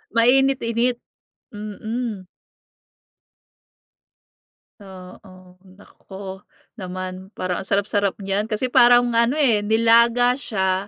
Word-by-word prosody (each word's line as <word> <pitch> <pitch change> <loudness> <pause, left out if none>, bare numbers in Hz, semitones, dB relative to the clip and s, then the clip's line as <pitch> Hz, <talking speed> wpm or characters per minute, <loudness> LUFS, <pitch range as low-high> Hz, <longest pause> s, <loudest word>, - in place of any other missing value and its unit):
Mainit-init. 245 -1 +2 0.6
Mm. 215 0 -6 2.5
Oo. 185 -1 -14 0.2
Naku, 190 -1 -11 0.4
naman. 185 0 -7
Parang 180 -1 -3
ang 190 - -8
sarap-sarap 200 0 0
niyan 195 +2 -2
kasi 230 +3 -3
parang 245 0 +6
ano 235 +3 +2
eh, 260 -9 +2
nilaga 230 +3 +3
siya 190 -5 -2
210 Hz, 85 wpm, -21 LUFS, 190-235 Hz, 2.5 s, parang